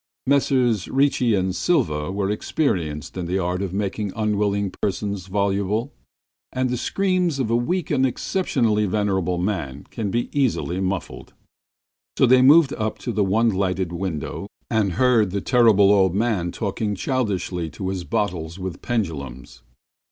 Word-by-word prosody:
Messrs 130 -6 +2
Ricci 135 -4 +2
and 95 -1 -1
Silva 95 - 0
were 100 0 -1
experienced 85 - -2
in 90 -2 -3
the 90 +2 0
art 90 0 -1
of 95 -3 -3
making 100 +1 -2
unwilling 100 -2 0
persons 100 -1 -2
voluble, 100 +5 -1 0.6
and 130 -1 -1
the 125 - -1
screams 185 0 0
of 125 -4 -1
a - - +3
weak 170 +10 -1
and 135 -3 +2
exceptionally 115 - 0
venerable 95 -3 0
man 85 -8 -3
can 110 -3 -3
be 120 +4 -1
easily 125 -10 0
muffled. 95 -1 -4 0.8
So - - +5
they 130 +1 +6
moved 145 +2 +6
up 110 0 -2
to 120 - -4
the 105 -2 +1
one 110 +5 +2
lighted 95 -3 -1
window 90 +1 -4 0.2
and 105 -5 +1
heard 115 -1 +3
the 100 +2 -2
Terrible 110 -4 +4
Old 95 -3 +3
Man 100 -6 0
talking 105 0 -2
childishly 95 - -2
to 95 +3 -5
his 95 -2 -3
bottles 90 -6 -2
with 95 -2 -6
pendulums. 70 - -4
100 Hz, 150 wpm, -22 LUFS, 95-120 Hz, 0.8 s, they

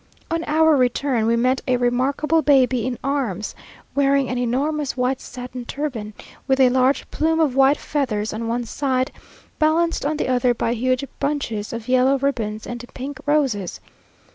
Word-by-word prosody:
On 330 0 0
our 315 +1 +4
return 250 -2 +1
we 230 - +3
met 255 +2 +1
a 255 -1 +3
remarkable 270 +6 +1
baby 260 -4 +3
in 250 -2 -3
arms, 255 -8 -2 0.4
wearing 275 -1 +2
an 250 - -2
enormous 275 +4 -1
white 255 +1 0
satin 250 -1 -7
turban, 235 -6 -5 0.3
with 265 -1 +2
a 260 -1 +6
large 260 +2 +2
plume 320 +1 +1
of 295 -6 +2
white 270 +2 +5
feathers 220 -8 -2
on 225 +1 -4
one 235 +1 -1
side, 260 +1 -1 0.5
balanced 325 +2 +2
on 300 +2 -1
the - - -1
other 250 -1 +2
by 230 - 0
huge 255 +3 0
bunches 235 -8 -2
of 230 -1 -6
yellow 255 +2 +3
ribbons 225 -6 -2
and 240 0 -6
pink 270 +2 -6
roses. 265 - 0
255 Hz, 165 wpm, -22 LUFS, 245-285 Hz, 0.5 s, a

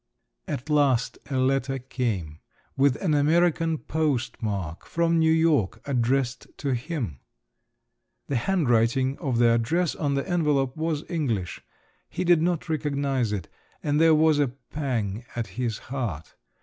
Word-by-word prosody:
At 125 - -4
last 140 -5 +2
a 135 - -1
letter 135 +1 +1
came, 110 - -3 0.4
with 135 -1 +3
an 165 -5 +2
American 165 +2 +2
postmark, 120 - -2
from 170 0 +1
New 160 0 +4
York, 155 - +2
addressed 130 -1 0
to 140 -2 -1
him. 120 - -3 1.1
The 140 - -2
handwriting 130 -4 +2
of 135 -8 -1
the 120 0 +5
address 150 +9 +1
on 145 -3 -1
the 140 - -2
envelope 150 -7 +1
was 160 -1 -2
English…. 115 - -2 0.5
He - - -3
did 175 -2 +4
not 175 -1 0
recognise 140 -6 0
it, 95 -6 -3 0.4
and 150 +1 +1
there 165 -1 +6
was 155 -1 +4
a 145 - +3
pang 125 -5 -4
at 120 -1 -1
his 120 -2 -3 0.2
heart. 105 - -4
135 Hz, 135 wpm, -26 LUFS, 120-155 Hz, 1.1 s, there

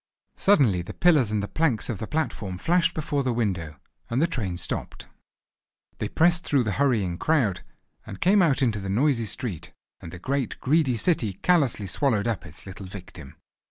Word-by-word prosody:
Suddenly 130 - +3
the 85 - -9
pillars 155 -10 +4
and 105 -1 -1
the - - -3
planks 150 -6 0
of 110 -6 -4
the 110 - -5
platform 115 - -3
flashed 170 - +1
before 145 -2 -1
the 130 -2 0
window, 95 -10 -2 0.3
and 120 - 0
the 160 - +4
train 110 - -3
stopped. 85 - -4 0.9
They - - -2
pressed 175 +1 +3
through 140 -5 +2
the 110 - -1
hurrying 105 -11 +1
crowd, 130 - +1 0.4
and 95 - -9
came 195 +3 +4
out 145 -5 +2
into 110 -4 +1
the 95 -1 -5
noisy 120 +3 +2
street; 95 - -4 0.3
and 80 - -10
the 90 - -8
great, 135 +6 -2
greedy 135 -3 +2
city 115 - +1
callously 140 - +2
swallowed 105 +2 0
up 115 -7 -2
its 75 - -13
little 95 0 -9
victim. 85 -7 -11
115 Hz, 180 wpm, -25 LUFS, 95-150 Hz, 0.9 s, pillars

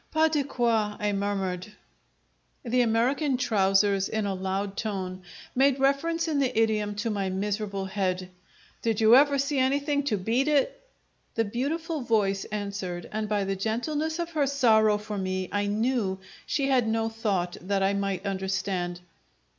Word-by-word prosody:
"Pas 315 0 +3
de 295 -2 +1
quoi!" 230 -5 0
I 210 0 0
murmured. 195 -1 -2 0.9
The 245 +1 +2
American 250 +5 +2
trousers 195 -4 +2
in 220 -1 -1
a 200 - -1
loud 190 +1 -3
tone 190 -4 -4 0.3
made 270 +1 +3
reference 330 +5 +1
in 300 -3 0
the 255 -5 +1
idiom 210 -2 +1
to 215 +2 -2
my 200 -2 -1
miserable 200 0 -2
head: 185 -1 -2 0.5
"Did 225 -2 0
you 220 +1 +7
ever 285 +1 +5
see 275 0 0
anything 285 +2 +1
to 215 -7 +1
beat 230 +9 0
it?" 300 - +1 0.5
The 225 - +1
beautiful 300 +8 -2
voice 205 -5 +1
answered, 200 -4 -4
and 215 0 -3
by 205 -1 +1
the 195 0 -1
gentleness 295 - -2
of 340 -1 -3
her 300 -4 +1
sorrow 220 -6 +4
for 210 -1 -5
me 185 -1 -2
I 205 0 0
knew 215 -2 0 0.3
she 275 -2 0
had 255 -4 +3
no 225 0 +1
thought 205 -6 -2
that 195 +1 0
I 195 +1 +2
might 195 -1 -2
understand. 190 -2 -2
215 Hz, 160 wpm, -27 LUFS, 195-265 Hz, 0.9 s, you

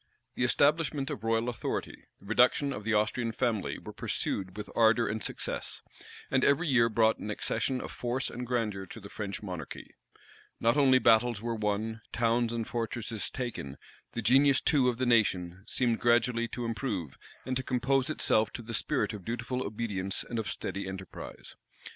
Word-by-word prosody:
The - - -1
establishment 145 +2 +2
of 105 - -5
royal 115 +1 +1
authority, 120 -2 -4
the - - -18
reduction 125 +6 +3
of 105 - -6
the 115 +1 +1
Austrian 110 +2 +1
family, 115 -4 -1
were - - -9
pursued 95 0 -3
with 105 - -5
ardor 115 0 +4
and 110 +1 -2
success; - - -3 0.5
and 130 0 +3
every 140 +5 +4
year 120 -4 +4
brought 110 0 +3
an 105 - -5
accession 130 +4 -1
of - - -6
force 125 +2 -2
and 125 0 -5
grandeur 105 -6 -1
to - - -9
the 100 -1 -10
French 100 0 -5
monarchy. 90 -7 -7 0.7
Not 115 +2 +3
only 135 -3 +6
battles 115 -2 +4
were 120 0 -1
won, 110 +1 -2
towns 115 0 +1
and 115 -1 -2
fortresses 115 -1 -3
taken; 115 - -5 0.4
the 115 - -3
genius 135 +3 +5
too 135 -5 +3
of 120 - -2
the 130 - 0
nation 95 -6 +2
seemed 120 -2 +1
gradually 120 0 +3
to 120 +1 -5
improve, 110 - -3 0.3
and 130 - -2
to 130 - +1
compose 130 +2 +1
itself 110 -7 +2
to 120 - -6
the 115 +1 -7
spirit 105 - 0
of 105 -3 -7
dutiful 120 +3 -3
obedience 100 -4 -2
and 115 - -3
of 110 - -3
steady 100 -1 -4
enterprise. 95 -2 -8
115 Hz, 175 wpm, -30 LUFS, 105-125 Hz, 0.7 s, only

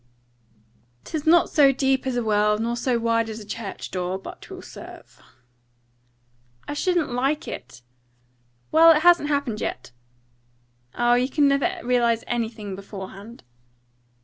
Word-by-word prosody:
"''Tis 315 -1 -5
not 340 +1 +5
so 280 -3 +5
deep 265 0 0
as 260 - -1
a 245 - 0
well, 210 -1 +2
nor 230 +2 -2
so 245 0 0
wide 230 -1 0
as 220 0 -6
a 210 - -10
church 205 -1 -7
door, 185 0 -2
but 195 - -10
'twill - - -10
serve.'" - - -13 1.5
"I - - -3
shouldn't 340 -1 0
like 270 +5 -1
it." 120 - -9 0.9
"Well, 330 +1 +7
it 310 - -2
hasn't 345 -4 +5
happened 280 -7 -1
yet." 125 - -5 1.0
"Ah, 240 0 +3
you 250 +2 +2
never 280 -1 +3
can - - -7
realise 235 -2 +2
anything 225 -4 -3
beforehand." 200 - -10
240 Hz, 140 wpm, -24 LUFS, 215-280 Hz, 1.5 s, Well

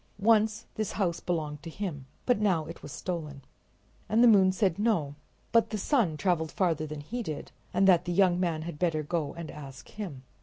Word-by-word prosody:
Once 220 +1 +3
this 215 -2 -3
house 180 -4 0
belonged 155 -4 -3
to 165 - -7
him, 160 -7 -5 0.2
but 245 -4 +3
now 185 -7 +2
it 165 +2 -9
was 145 - -9
stolen. 150 -6 -5 0.7
And 225 +3 +4
the - - +8
moon 195 -4 +6
said 190 -2 +1
no, 205 -11 +1 0.4
but 230 -1 +5
that - - -27
the 215 - -2
sun 205 - +1
traveled 160 0 0
farther 165 -5 0
than 150 -1 -6
he 240 +12 -4
did, 155 -9 -5 0.2
and 195 - +3
that 180 -2 +5
the 175 - -2
young 180 -1 +4
man 165 -4 0
had 160 -3 -7
better 165 -4 +1
go 155 -1 -2
and 170 -2 -6
ask 140 -3 -10
him. 175 -12 -7
175 Hz, 205 wpm, -29 LUFS, 155-205 Hz, 0.7 s, the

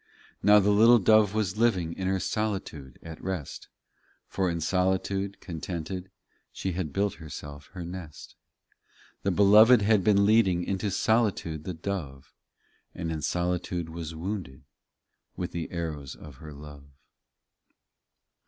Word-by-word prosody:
35 - - -35
Now 105 0 +7
the 105 +1 +3
little 115 +4 +7
dove 110 0 +4
was 105 -2 -1
living 95 -8 +1
In 95 +1 -4
her 95 0 +1
solitude 95 - -3
at 80 -1 -9
rest; 90 -6 -5 0.6
For 95 -2 -1
in 85 -1 -2
solitude, 95 +3 0
contented, 90 +1 -5 0.4
She 95 - -3
had 85 -4 -3
built 100 +5 0
herself 75 -2 -9
her 90 -3 -6
nest. 85 -4 -9 0.9
Tke 95 -2 0
Beloved 105 +3 +7
had 105 -2 +3
been 100 0 +4
leading 100 -5 +3
Into 100 +2 -2
solitude 100 -7 0
the 90 - -4
dove, 80 -7 -6 0.6
And 85 -2 -4
in 80 -1 -3
solitude 90 +1 -2
was 80 -1 -6
wounded 85 -6 -5 0.7
With 90 - -4
the 85 -1 -4
arrows 80 -6 -5
of 75 -4 -13
her 75 +2 -10
love. 70 -1 -11
90 Hz, 135 wpm, -27 LUFS, 80-100 Hz, 0.9 s, Now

